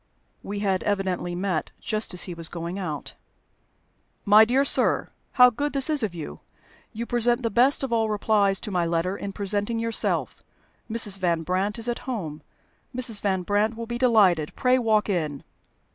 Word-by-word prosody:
We 205 0 -5
had 195 -2 0
evidently 190 -3 -2
met 180 -3 -2
just 215 0 -2
as 180 - 0
he 180 - -5
was 165 -1 +1
going 170 +3 -5
out. 155 -6 -5 1.1
"My 210 +2 +7
dear 260 +5 +2
sir, - - +2 0.2
how 250 -1 +7
good 290 +5 -3
this 275 +2 +2
is 300 -3 +2
of 205 -6 -2
you! 160 -3 -7 0.5
You 235 +1 -5
present 240 +1 +1
the 230 - -1
best 260 +7 +3
of 260 -3 -2
all 225 -1 +1
replies 205 -2 +2
to 210 - -6
my 180 -2 +1
letter 170 +3 -1
in 200 0 -5
presenting 205 +3 -1
yourself. 230 0 -2 0.5
Mrs. 215 -3 0
Van 170 -3 0
Brandt 190 +5 -1
is 230 +1 -4
at 240 - -2
home. 165 -12 -4 0.5
Mrs. 235 -5 -1
Van 190 -2 0
Brandt 210 +4 0
will 230 - -5
be 240 +1 -5
delighted. 200 -11 +3
Pray 255 0 +2
walk 220 -3 +2
in." 155 -8 -2
205 Hz, 175 wpm, -25 LUFS, 180-235 Hz, 1.1 s, My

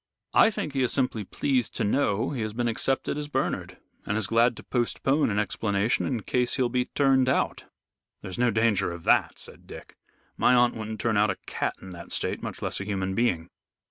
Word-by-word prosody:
I 225 - +6
think 155 -9 -4
he 135 - 0
is 125 - +2
simply 125 -5 0
pleased 125 +5 -1
to - - -1
know 110 +1 +1
he 130 -5 -3
has 110 -1 -3
been 120 +1 -1
accepted 135 +5 -1
as 150 - -4
Bernard, 145 - -2 0.3
and 100 - -2
is 110 - 0
glad 115 +2 +2
to - - -9
postpone 135 +4 0
an 100 - -1
explanation 105 +1 0
in 120 -6 -2
case 125 -1 +1
he'll 125 -2 +1
be 125 +1 0
turned 135 -2 +2
out." - - 0 0.6
"There's 95 +4 -6
no 125 0 +3
danger 110 -4 +1
of 85 -1 -8
that," - - +3
said - - -13
Dick. - - -11 0.4
"My 125 - +4
aunt 120 0 +4
wouldn't 110 -1 -6
turn 110 -3 +1
out 105 0 +3
a 100 - 0
cat - - -2
in 95 - -9
that 85 -1 -9
state, - - -1
much - - -6
less - - -2
a - - -5
human 95 -2 -2
being." 90 -7 0
115 Hz, 210 wpm, -26 LUFS, 100-125 Hz, 0.6 s, I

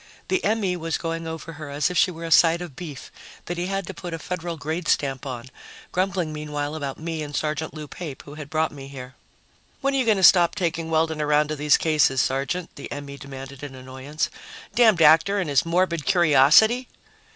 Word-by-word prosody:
The 375 - +1
M.E. 205 -3 +1
was 165 -1 -2
going 165 0 -4
over 160 0 -6
her 155 -1 -8
as 145 +4 0
if - - -5
she 185 - +4
were 170 -2 -8
a 165 - -5
side 165 +2 +6
of 175 -6 -8
beef 150 -5 -8 0.3
that 175 0 -4
he 175 - -2
had 195 0 -2
to 190 - -7
put 175 -2 -6
a - - -5
federal 170 0 -5
grade 160 +3 -4
stamp 135 -1 0
on, 130 0 -7 0.4
grumbling 180 -3 -1
meanwhile 150 -1 -4
about 140 -4 -4
me 160 0 -4
and 145 -1 -6
Sergeant 155 +2 -2
Lou 155 -1 -7
Pape, 150 -3 -8
who 145 - -11
had 150 -1 -9
brought 160 +1 0
me 135 -2 -10
here. 130 -1 -9 0.7
"When 275 0 +1
are - - +1
you 260 - +1
going 220 -3 +3
to 190 - -1
stop 175 -1 +6
taking 165 -2 -2
Weldon 160 -1 +1
around 150 0 +2
to 155 - -2
these 150 0 +4
cases, 150 -4 +2
Sergeant?" 140 +8 -1
the 140 - -8
M.E. 140 -1 -6
demanded 135 -1 -9
in 145 -2 -8
annoyance. 130 +4 -4 0.4
"Damned 215 -7 +5
actor 160 +6 +5
and 190 -4 -1
his 140 +4 +2
morbid 170 -2 +1
curiosity!" 175 - +5
160 Hz, 210 wpm, -24 LUFS, 145-175 Hz, 0.7 s, side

